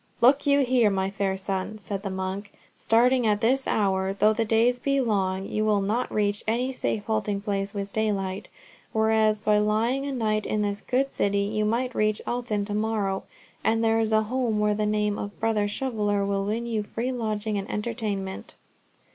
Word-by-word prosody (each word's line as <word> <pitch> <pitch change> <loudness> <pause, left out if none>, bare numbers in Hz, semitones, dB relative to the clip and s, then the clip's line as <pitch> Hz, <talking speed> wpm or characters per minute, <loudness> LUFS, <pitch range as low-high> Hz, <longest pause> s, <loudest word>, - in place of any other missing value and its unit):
"Look 270 +4 +4
you 285 0 +5
here, 250 -4 +3
my 190 -1 -1
fair 195 -1 -1
son," 190 +2 -3
said 200 -1 -5
the 200 - -4
monk. 190 +2 -4 0.2
"Starting 245 +1 +3
at 210 -1 +2
this 260 +5 +1
hour, 190 -2 +1
though 210 +2 +3
the 225 +1 0
days 230 +3 +3
be 275 +2 +1
long, 195 -6 0
you 215 - -1
will 210 -1 +3
not 215 +6 -1
reach 205 -1 0
any 245 +4 0
safe 115 - -2
halting 200 - -1
place 200 0 -2
with 200 0 -4
daylight, 200 -3 -1 0.5
whereas 220 -1 +2
by 210 -1 +3
lying 230 +6 +1
a - - -2
night 215 -4 0
in 210 0 0
this 205 0 -2
good 270 +2 0
city, 200 0 +1
you 215 +1 -1
might 240 +4 0
reach 215 -1 +1
Alton 235 -4 -2
to 205 - -5
morrow, 210 -3 -1 0.4
and 225 0 +2
there 225 0 +3
is 220 -1 0
a 220 0 +4
home 235 -1 -1
where 210 0 +2
the 210 0 0
name 210 -1 0
of 205 0 -6
Brother 220 -2 +1
Shoveller 205 -3 -1
will 195 0 -1
win 225 +3 -2
you 225 -2 -1
free 230 +4 -3
lodging 215 -3 -2
and 195 - -7
entertainment." 210 -3 -4
215 Hz, 190 wpm, -26 LUFS, 200-230 Hz, 0.5 s, you